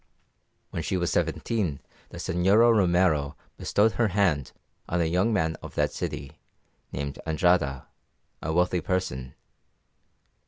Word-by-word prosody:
When -, -, -3 dB
she 95 Hz, +4 st, -1 dB
was 90 Hz, -1 st, 0 dB
seventeen 95 Hz, -12 st, -1 dB, 0.3 s
the -, -, -10 dB
Señora 105 Hz, +7 st, +4 dB
Romero 85 Hz, -7 st, +2 dB, 0.2 s
bestowed 110 Hz, +2 st, +2 dB
her 115 Hz, 0 st, +1 dB
hand 90 Hz, -9 st, +1 dB, 0.4 s
on 85 Hz, -, 0 dB
a 85 Hz, -, +2 dB
young 90 Hz, +7 st, +1 dB
man 80 Hz, -6 st, +1 dB
of -, -, -10 dB
that -, -, +1 dB
city, 70 Hz, +1 st, -5 dB, 0.5 s
named 70 Hz, 0 st, -4 dB
Andrada, 80 Hz, -5 st, +2 dB, 0.6 s
a 80 Hz, -, -2 dB
wealthy 90 Hz, +1 st, +2 dB
person. 75 Hz, -9 st, -3 dB
90 Hz, 125 wpm, -26 LUFS, 75-95 Hz, 0.6 s, Señora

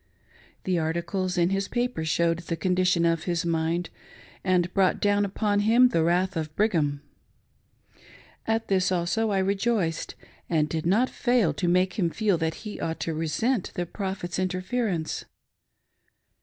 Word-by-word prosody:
The 185 Hz, -2 st, 0 dB
articles 170 Hz, +3 st, -2 dB
in 175 Hz, +1 st, +2 dB
his 195 Hz, 0 st, 0 dB
paper 245 Hz, -8 st, -2 dB
showed 165 Hz, +1 st, +1 dB
the 170 Hz, 0 st, -4 dB
condition 180 Hz, 0 st, +2 dB
of 165 Hz, -1 st, +1 dB
his 170 Hz, -2 st, -1 dB
mind, 165 Hz, +1 st, -1 dB, 0.5 s
and 180 Hz, -2 st, +1 dB
brought 190 Hz, -2 st, +2 dB
down 205 Hz, 0 st, +2 dB
upon 205 Hz, +1 st, 0 dB
him 235 Hz, +4 st, +5 dB
the 165 Hz, -8 st, +1 dB
wrath 180 Hz, +3 st, +1 dB
of 155 Hz, -1 st, -4 dB
Brigham; 155 Hz, -9 st, +1 dB, 1.4 s
At 225 Hz, 0 st, 0 dB
this 185 Hz, -2 st, +2 dB
also 185 Hz, +5 st, 0 dB
I 200 Hz, -, +1 dB
rejoiced, 195 Hz, -3 st, 0 dB, 0.3 s
and 155 Hz, -3 st, +2 dB
did 160 Hz, +1 st, -3 dB
not 220 Hz, +8 st, +3 dB
fail 240 Hz, -, +2 dB
to 175 Hz, +4 st, -2 dB
make 185 Hz, +3 st, +2 dB
him 175 Hz, -3 st, +2 dB
feel 200 Hz, -1 st, 0 dB
that 160 Hz, 0 st, -1 dB
he 210 Hz, -, -6 dB
ought 165 Hz, 0 st, -3 dB
to 165 Hz, -, -2 dB
resent 175 Hz, -, -1 dB
the 175 Hz, -, -1 dB
Prophet's 190 Hz, -1 st, -4 dB
interference. 185 Hz, -1 st, -2 dB
180 Hz, 150 wpm, -26 LUFS, 165-200 Hz, 1.4 s, him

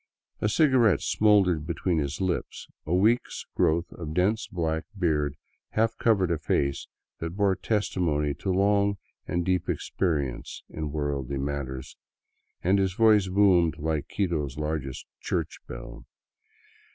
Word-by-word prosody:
A 105 Hz, -, +1 dB
cigarette 120 Hz, -, +4 dB
smouldered 95 Hz, -7 st, +3 dB
between 85 Hz, +1 st, 0 dB
his 70 Hz, 0 st, -3 dB
lips, 95 Hz, -2 st, -2 dB, 0.2 s
a 80 Hz, -, 0 dB
week's 110 Hz, +6 st, +1 dB
growth 85 Hz, +2 st, +1 dB
of 80 Hz, -2 st, -7 dB
dense 100 Hz, +5 st, +1 dB
black 80 Hz, -3 st, -2 dB
beard 75 Hz, -5 st, +1 dB, 0.4 s
half 115 Hz, +1 st, +2 dB
covered 100 Hz, -7 st, +3 dB
a 80 Hz, -, 0 dB
face 70 Hz, -2 st, 0 dB, 0.3 s
that 80 Hz, +2 st, -4 dB
bore 100 Hz, -2 st, +3 dB
testimony 85 Hz, -8 st, 0 dB
to 95 Hz, -, -5 dB
long 100 Hz, +1 st, +2 dB, 0.3 s
and 85 Hz, 0 st, -1 dB
deep 90 Hz, 0 st, 0 dB
experience 75 Hz, -9 st, -2 dB
in 75 Hz, -2 st, -4 dB
worldly 70 Hz, -3 st, -2 dB
matters, 70 Hz, -1 st, -4 dB, 0.7 s
and 95 Hz, +3 st, +3 dB
his 95 Hz, -2 st, +1 dB
voice 105 Hz, -2 st, +5 dB
boomed 95 Hz, -4 st, +4 dB
like 80 Hz, -1 st, -2 dB
Quito's 80 Hz, -8 st, -2 dB
largest 75 Hz, -3 st, -3 dB, 0.2 s
church -, -, -2 dB
bell. -, -, -9 dB
85 Hz, 130 wpm, -27 LUFS, 75-100 Hz, 0.7 s, voice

